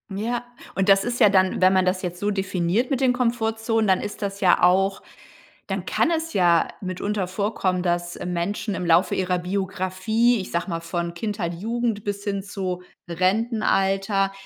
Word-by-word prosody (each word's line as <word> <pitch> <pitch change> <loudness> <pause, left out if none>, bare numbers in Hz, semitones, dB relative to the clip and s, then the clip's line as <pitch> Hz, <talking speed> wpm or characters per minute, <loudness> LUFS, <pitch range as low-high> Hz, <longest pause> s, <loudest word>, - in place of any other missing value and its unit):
Ja, 235 +4 -2 0.3
und 195 +2 0
das 195 0 +6
ist 245 0 -3
ja 215 -4 +7
dann 190 -2 +2
wenn 185 0 +6
man 185 -1 +3
das 185 0 0
jetzt 180 -1 -5
so 205 +1 0
definiert 190 +3 0
mit 270 -3 0
den 260 -2 +3
Komfortzonen, 225 -2 0
dann 190 -1 +3
ist 205 0 -6
das 200 0 -4
ja 180 -2 +4
auch 195 +2 +3 0.7
dann - - -3
kann - - +1
es 325 0 -1
ja 175 - +3
mitunter 190 +1 -3
vorkommen, 190 -2 -1
dass 175 -1 -1
Menschen 180 +4 -2
im 180 - -3
Laufe 170 +2 +4
ihrer 180 -1 0
Biografie, 195 +5 0
ich 185 - -7
sage 170 +3 -2
mal 165 -1 -2
von 170 +1 -4
Kindheit, 185 -2 -3
Jugend 225 +3 -2
bis 205 0 -4
hin 200 -1 -2
zu 190 -2 -4 0.3
Rentenalter, 195 +1 +1
195 Hz, 175 wpm, -23 LUFS, 180-215 Hz, 0.7 s, ja